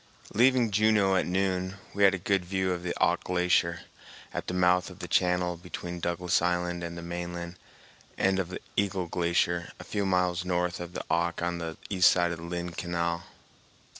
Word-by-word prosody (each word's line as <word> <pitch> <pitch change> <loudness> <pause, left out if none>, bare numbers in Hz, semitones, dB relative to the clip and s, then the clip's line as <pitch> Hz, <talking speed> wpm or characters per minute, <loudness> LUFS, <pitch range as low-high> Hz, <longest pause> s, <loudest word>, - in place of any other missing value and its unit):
Leaving 125 0 +4
Juneau 105 -1 +4
at 90 - +1
noon, 95 0 0 0.2
we 100 - +1
had 95 -1 +6
a - - -3
good 95 +1 +1
view 95 +1 -1
of 90 -1 -2
the 85 0 -4
Auk - - +2
Glacier 90 -1 +1 0.5
at - - -4
the - - -2
mouth 90 0 +3
of - - -12
the - - -6
channel 90 -1 +1
between 90 0 -6
Douglas 85 +1 +1
Island 90 0 0
and 85 0 -5
the 85 - -7
mainland, 85 0 -5 0.6
and 95 0 +2
of 90 -1 -3 0.2
Eagle 95 -2 0
Glacier 85 0 0
a - - -7
few 100 - -2
miles 90 -1 +1
north 90 -1 -1
of 90 0 -7
the - - -5
Auk 85 0 0
on 85 0 -1
the 80 -1 -5
east 90 -2 +6
side 85 -1 +2
of 85 - -5
Lynn 85 +1 -4
Canal. 85 0 -2
90 Hz, 185 wpm, -28 LUFS, 85-95 Hz, 0.6 s, had